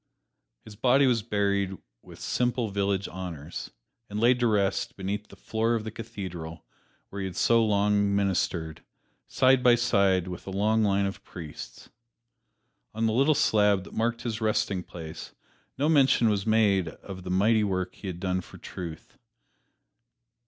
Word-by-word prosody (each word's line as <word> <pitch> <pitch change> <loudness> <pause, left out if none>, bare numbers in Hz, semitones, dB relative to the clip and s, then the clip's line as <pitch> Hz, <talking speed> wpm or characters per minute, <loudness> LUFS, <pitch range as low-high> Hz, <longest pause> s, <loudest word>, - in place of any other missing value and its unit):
His 110 - -11
body 130 +5 +4
was 120 -3 +2
buried 100 -3 0 0.2
with - - -14
simple 125 -2 0
village 100 0 0
honors, 85 -4 -7 0.4
and 105 +1 -4
laid 120 +2 +4
to 120 - +3
rest 100 -3 0
beneath 100 +2 -3
the - - -14
floor 115 +1 -1
of 110 - -2
the 110 - -5
Cathedral 90 -7 -7 0.4
where 100 - -6
he 95 - -2
had 95 - -8
so 115 -1 +4
long 100 -1 +2
ministered, 90 -5 -1 0.5
side 130 0 +4
by 125 -1 +6
side 100 -6 +2
with 90 0 -7
a - - -3
long 105 +3 +1
line 100 -1 +2
of 100 - -5
priests. 80 -4 -10 1.0
On 115 +1 0
the 110 - +1
little 140 +6 +3
slab 105 -8 +3
that - - -13
marked 115 +1 -1
his 115 -2 -3
resting 105 -3 0
place 80 -3 -9 0.4
no 145 +3 +1
mention 135 -6 +4
was 100 0 -1
made 105 -5 +3
of 95 +3 -9
the 90 - -7
mighty 105 +4 +3
work 95 -2 -1
he 100 - -9
had 90 -2 -5
done 95 0 -1
for - - -14
truth. 85 -4 -9
100 Hz, 160 wpm, -27 LUFS, 95-115 Hz, 1.0 s, by